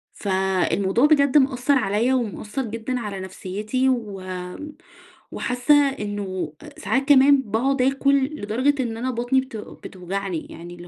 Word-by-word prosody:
فالموضوع 190 +3 +1
بجد 285 -2 +4
مأثرعليَّ 255 -4 +2
ومأثر 235 0 -2
جدًا 230 +3 -4
على 205 -4 -5
نفسيتي 205 +7 -2
و 215 -7 -2 1.1
وحاسّة 250 +4 +1 0.2
إنّه 195 - -4
أ - - -13
ساعات 270 0 -1
كمان 280 0 +6
باقعد 255 +4 0
آكل 275 +1 +2 0.2
لدرجة 255 +7 0
إن 225 -2 -4
أنا 255 +3 -2
بطني 245 +2 +1
بتو 235 -5 -9
بتوجعني 185 -2 -5
يعني 175 +1 -10
اللي 175 0 -12
230 Hz, 125 wpm, -23 LUFS, 195-265 Hz, 1.1 s, كمان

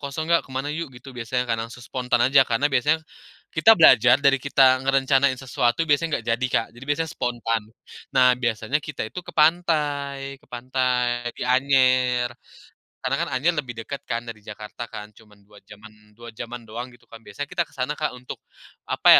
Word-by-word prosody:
"Kosong 145 +3 -5
nggak? 170 0 +3
Kemana 135 +2 -3
yuk." 165 -1 -4
gitu 130 +2 -12
biasanya 125 +1 -2
kan. 115 - +1
Langsung 115 +1 -8
spontan 125 0 -1
aja, 135 +1 +5
karena 130 +5 +1
biasanya 150 +5 +2 0.5
kita 220 +8 +6
belajar, 125 -7 +7
dari 140 -1 +6
kita 130 -2 +4
ngerencanain 135 0 +3
sesuatu 130 +3 0
biasanya 150 -1 +1
nggak 110 - -19
jadi, 130 +2 0
Kak. 115 - +1
Jadi 130 - -10
biasanya 160 +2 0
spontan. 115 -4 -2 0.5
Nah, 125 -1 +6
biasanya 120 +1 -1
kita 150 -5 -5
itu 180 - -7
ke - - -10
pantai 145 -4 +1
ke - - -25
pantai, 125 -1 -1
di - - -6
Anyer. 130 -2 +3 0.8
Karena - - 0
kan - - -6
Anyer 145 +7 +2
lebih 120 -4 -6
dekat 140 +4 -6
kan, 115 -1 -2
dari 115 -2 -9
Jakarta 105 +2 -8
kan, 105 0 -8
cuman 105 -2 -20
dua 105 0 -18
jam-an 105 0 -16
dua 120 0 -11
jam-an 120 +1 -8
doang, 115 +3 -7
gitu 120 - -25
kan. 115 - -13
Biasanya 115 +6 -8
kita 175 -1 +1
ke - - -23
sana 135 +3 -3
Kak, 150 -4 -2
untuk 125 0 -9 0.5
apa - - -1
130 Hz, 185 wpm, -23 LUFS, 120-140 Hz, 0.8 s, belajar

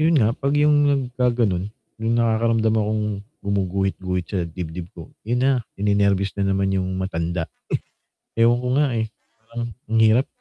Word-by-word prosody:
'Yon 160 +2 +4
nga, 110 -6 +4
'pag 140 +3 -1
'yong 150 0 +5 0.3
nagkagano'n 120 -7 +1 0.4
may 115 0 0
nakakaramdam 115 -1 +2
akong 105 0 0 0.4
gumuguhit-guhit 95 -2 -1
sa 100 - -3
dibdib 85 0 -6
ko. 85 -2 -10
'Yon 120 +2 +1
na, 135 - +5 0.3
ninenerbyos 100 -1 +2
na 100 -1 0
naman 95 0 +1
'yong 95 -1 -1
matanda. 85 -2 -2 0.9
Ewan 120 +1 +4
ko 125 - -3
nga, 150 - +4 0.2
eh, 110 - -2 0.3
parang 115 +1 -6 0.2
ang 115 0 +2
hirap. 115 +5 +4
105 Hz, 150 wpm, -22 LUFS, 95-120 Hz, 0.9 s, yong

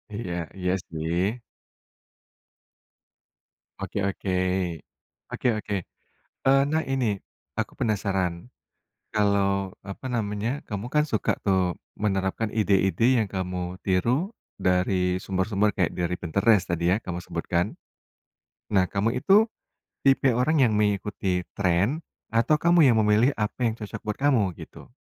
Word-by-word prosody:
Iya 95 -6 -4 0.2
iya 90 -1 0 0.2
sih. 85 +8 -1 2.4
Oke 100 - -3
oke, 95 0 -3 1.0
oke - - -2
oke, 105 - -3 0.7
eee, 135 +1 +6
nah 160 0 0
ini, 125 -7 0 0.4
aku - - -2
penasaran, 95 -4 -1 0.6
kalau 100 -2 +1
apa 100 +6 -8
namanya 115 +2 -2
kamu 105 +1 -5
kan 150 - +5
suka 130 -8 0
tuh 95 -3 +2 0.2
menerapkan 95 +1 0
ide-ide 110 +4 +3
yang 110 - +1
kamu 90 -1 -4
tiru 120 - +1 0.3
dari 90 0 +2
sumber-sumber 100 +2 0
kayak 90 -4 +1
dari 90 0 0
Pinterest 95 +3 +2
tadi 85 +1 +2
ya 110 - -3
kamu 90 -1 -4
sebutkan. 85 +2 -2 1.0
Nah 95 -3 +3
kamu 105 +7 -1
itu, 205 - +4 0.6
tipe 135 0 +4
orang 140 +4 +2
yang 110 -5 +4
mengikuti 100 -3 0 0.2
tren 100 - +1 0.2
atau 115 +7 +2
kamu 170 -2 +5
yang 115 - +2
memilih 110 +6 +4
apa 110 +2 -2
yang 115 - +2
cocok 105 0 -6
buat 105 -1 -3
kamu 120 -10 +3
gitu? - - -12
100 Hz, 120 wpm, -26 LUFS, 95-115 Hz, 2.4 s, eee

